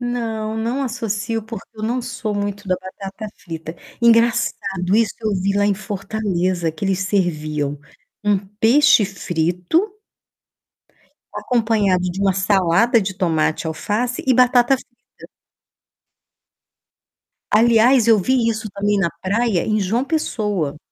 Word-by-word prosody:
Não, 225 -3 -3
não 235 +5 -2
associo, 225 -2 -3
porque 225 +1 -9
eu 215 - -9
não 245 +3 -1
sou 235 -4 -4
muito 205 0 -4
da 185 - +1
batata 195 +3 -8 0.2
frita. 165 -1 -7 0.2
Engraçado, 220 -5 +2
isso 230 -2 +1
eu 215 -2 -1
vi 200 +1 0
lá 205 - +2
em 205 - +2
Fortaleza, 185 -4 -2
que 155 +5 -6
eles 195 -1 0
serviam 155 -7 -1 0.5
um 205 -1 +3
peixe 220 +5 +3
frito 180 - -1 1.4
acompanhado 215 -6 +1
de 190 +3 -6
uma 195 -1 +3
salada 195 +4 +3
de 190 -1 -3
tomate, 160 -4 0
alface 210 +10 -2
e 260 - +4
batata 250 +1 +4
frita. 255 - -16 2.6
Aliás, 235 +2 +4
eu 225 -2 +6
vi 240 +3 +1
isso 220 -1 -3
também 205 +1 0
na 170 -3 +1
praia 205 -1 0
em 215 0 +1
João 225 +7 0
Pessoa. 210 - -2
210 Hz, 125 wpm, -20 LUFS, 185-230 Hz, 2.6 s, eu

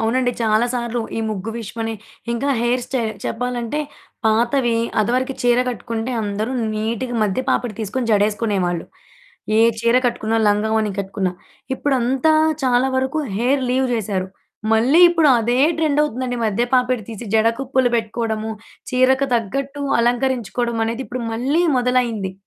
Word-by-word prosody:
అవునండి. 245 +2 +1
చాలా 220 +2 +3
సార్లు 235 0 -2 0.2
ఈ - - -1
ముగ్గు 210 +1 -4
విషయమనే, 225 0 -4 0.4
ఇంకా 260 +4 -1
హెయిర్ 240 +1 +1
స్టైల్. 230 -5 -2
చెప్పాలంటే, 245 +3 -2 0.5
పాతవి 235 +2 +2 0.2
అదవరకి 255 +5 0
చీర 245 0 +3
గట్టుకుంటే 230 0 -4
అందరూ 210 +4 -2 0.2
నీటుగా 230 +3 -2
మధ్య 205 +5 0
పాపిడి 240 -5 0
తీసుకొని 230 +3 -2
జడేసుకునేవాళ్ళు, 200 -4 +1 0.7
ఏ - - +6 0.2
చీర 235 +1 +3
కట్టుకున్నా, 225 -2 -1
లంగావోణి 215 +1 +1
కట్టుకున్నా. 190 -1 -2 0.4
ఇప్పుడంతా 270 +2 +1 0.3
చాలా 250 0 +3
వరకు 265 +4 0 0.2
హెయిర్ 260 +5 +1
లీవ్ 260 +1 +2
జేశారు. 195 -4 -2 0.4
మళ్ళీ 250 +9 +4
ఇప్పుడు 330 -3 +3
అదే 240 +3 +1 0.2
ట్రెండవుతుందండి, 285 -5 0
మధ్య 215 +2 0
పాపిడి 250 -2 +2
తీసి 225 +1 -7
జడ 220 0 +4
కుప్పులు 260 -2 +1
పెట్టుకోడము, 220 -1 -2 0.4
చీరకు 260 +2 +3
తగ్గట్టు 275 +6 -2 0.2
అలంకరించుకోడమనేది 240 -1 0
ఇప్పుడు 250 0 -5
మళ్ళీ 275 +9 +1 0.2
మొదలైంది. 240 -6 0
235 Hz, 125 wpm, -20 LUFS, 220-255 Hz, 0.7 s, ఏ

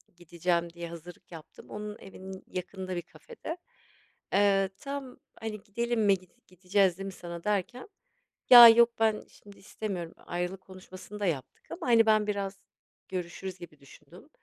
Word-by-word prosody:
gideceğim 170 0 -2
diye 170 -1 -7
hazırlık 170 +1 -12
yaptım. 160 -2 -12
Onun 210 0 -6
evinin 190 0 -10
yakınında 185 0 -5
bir 175 - -2
kafede. 365 - -9 0.8
Eee, 195 -1 +3
tam 275 -2 -6 0.2
hani 215 -2 -5
gidelim 235 +3 -2
mi 200 -3 +4
git 185 -1 -25
gideceğiz 185 0 +1
değil 195 - -5
mi 195 - -5
sana 170 -1 -8
derken, 210 - -2 0.6
ya 240 -2 +13
yok 235 +1 +7
ben 220 -1 +2
şimdi 205 -1 -17
istemiyorum, 195 -5 -5
ayrılık 180 +2 -4
konuşmasını 185 +2 -11
da 205 - -1
yaptık 155 -5 -4
ama 165 - -6
hani 230 -2 +6
ben 215 -1 +3
biraz 200 -1 -3 0.5
görüşürüz 185 +1 -5
gibi 155 -4 -12
düşündüm. 140 - -17
195 Hz, 150 wpm, -29 LUFS, 175-210 Hz, 0.8 s, ya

